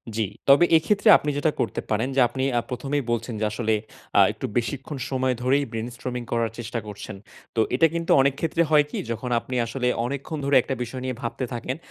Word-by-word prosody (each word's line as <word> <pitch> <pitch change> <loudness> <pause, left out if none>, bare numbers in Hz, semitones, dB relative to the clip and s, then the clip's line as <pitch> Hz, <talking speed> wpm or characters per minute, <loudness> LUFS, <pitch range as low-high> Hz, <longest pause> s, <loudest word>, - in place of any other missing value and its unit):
জি। 110 -1 +1 0.2
তবে 140 +5 +7
এক্ষেত্রে 205 +6 +2
আপনি 150 - -3
যেটা 155 +2 +2
করতে 115 - -1
পারেন 110 +3 +1
যে 135 - +4
আপনি 130 +2 -4 0.3
প্রথমেই 135 +3 -2
বলছেন 115 +1 -2
যে 110 - 0
আসলে 110 +1 0 0.4
আ - - +8
একটু - - -6
বেশিক্ষণ 135 +4 -3
সময় 130 -1 0
ধরেই 140 +3 +2
ব্রেইনস্টর্মিং 120 +2 -5
করার 115 -2 0
চেষ্টা 115 0 -3
করছেন। 105 -1 -7 0.4
তো 115 - +3
এটা 165 +5 +5
কিন্তু 170 0 -1
অনেক 140 0 +3
ক্ষেত্রে 165 +1 +1
হয় 150 -2 +5
কি - - -4
যখন 120 +2 -4
আপনি 125 +2 -6
আসলে 125 +2 -2 0.2
অনেকক্ষণ 140 +4 -4
ধরে, 140 0 +2
একটা 135 +2 -3
বিষয় 125 +2 -7
নিয়ে 130 -1 -2
ভাবতে 120 +1 -3
থাকেন, 120 +2 -3
130 Hz, 195 wpm, -24 LUFS, 115-140 Hz, 0.4 s, আ